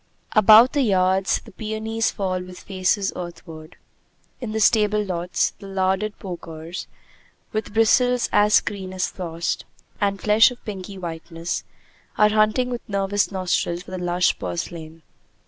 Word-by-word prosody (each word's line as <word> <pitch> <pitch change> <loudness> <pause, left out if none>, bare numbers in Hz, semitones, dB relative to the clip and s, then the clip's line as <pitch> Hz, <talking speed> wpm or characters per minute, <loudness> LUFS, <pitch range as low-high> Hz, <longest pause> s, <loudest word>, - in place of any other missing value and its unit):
About 220 +3 +7
the 290 - +2
yards 190 -4 +2
the - - -13
peonies 220 +2 -2
fall 185 -3 -2
with 180 0 -10
faces 195 +1 0
earthward. 165 -3 -9 0.6
In 240 -4 -5
the 220 - -2
stable 210 -1 +3
lots 180 -1 -1
the 200 - -10
larded 195 +2 -1
porkers, 170 -2 -7 0.6
with 215 0 -4
bristles 245 +2 +3
as 210 0 +5
clean 190 -2 -5
as 185 0 -1
frost, 170 -2 -3 0.4
and 200 -1 +1
flesh 215 +4 +5
of 250 - -12
pinky 195 -1 -7
whiteness, 165 -1 -5 0.5
are 210 - +5
hunting 215 +4 +2
with 240 - -3
nervous 200 0 0
nostrils 180 -2 -1
for 185 - -13
the 185 - -4
lush 175 0 +1
purslain. 155 - -6
195 Hz, 140 wpm, -23 LUFS, 180-215 Hz, 0.6 s, About